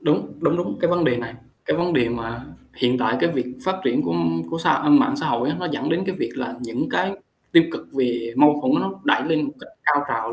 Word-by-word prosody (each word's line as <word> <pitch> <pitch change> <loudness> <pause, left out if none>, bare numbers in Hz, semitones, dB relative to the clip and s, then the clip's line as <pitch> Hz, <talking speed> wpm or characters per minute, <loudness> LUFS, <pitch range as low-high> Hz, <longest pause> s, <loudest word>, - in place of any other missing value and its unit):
Đúng, 150 -1 0
đúng, 165 - +2
đúng. 175 +1 -3
Cái 175 - +2
vấn 175 -1 +2
đề 125 -5 +3
này, 115 -1 -6 0.3
cái - - 0
vấn 175 +1 0
đề 120 -7 +3
mà 115 +1 -5 0.3
hiện 125 0 +2
tại 125 0 +1
cái 170 - +3
việc 130 -7 -2 0.2
phát 190 0 0
triển - - +2
của 85 - -1 0.4
của - - -3
xã - - +2
mạng 280 -2 +5
xã 290 - -2
hội 120 +3 0
á, 150 - -2
nó 180 - -2
dẫn 145 - -2
đến 170 +3 +1
cái 190 - -1
việc - - -2
là 130 - -4
những 120 -1 -3
cái 190 +1 0 0.4
tiêu 165 - +8
cực - - -7
về 120 -3 -1
mâu 150 0 +6
thuẫn 260 - +2
nó 195 - -2
đẩy - - +3
lên 160 -2 +1
một 140 - -4
cách - - -13 0.2
cao 145 -1 +3
trào 115 0 -2
145 Hz, 255 wpm, -22 LUFS, 120-175 Hz, 0.4 s, tiêu